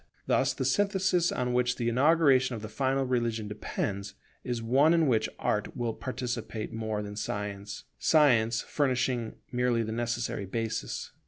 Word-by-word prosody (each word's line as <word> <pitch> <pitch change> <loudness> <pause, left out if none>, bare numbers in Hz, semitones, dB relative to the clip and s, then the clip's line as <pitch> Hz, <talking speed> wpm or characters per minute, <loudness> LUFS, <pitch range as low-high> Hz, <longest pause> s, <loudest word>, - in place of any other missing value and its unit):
Thus - - +2
the - - -2
synthesis 190 -4 +2
on 125 -1 -1
which 125 0 +2
the 120 - -2
inauguration 135 0 +4
of 110 - -7
the 110 - -5
final 135 +4 0
religion 120 -4 -1
depends, 100 -1 -4 0.3
is 120 -2 -2
one 135 +8 +4
in 165 -1 +3
which 120 -6 +2
Art 105 +5 -1
will 120 -2 -1
participate 120 -3 -4
more 110 -2 -2
than 105 0 -7
Science, 105 -1 -4 0.2
Science 120 -7 +4
furnishing 125 -4 0 0.2
merely 125 -2 +1
the 110 - -4
necessary 115 -3 -2
basis. 115 +3 -3
120 Hz, 150 wpm, -29 LUFS, 110-130 Hz, 0.3 s, inauguration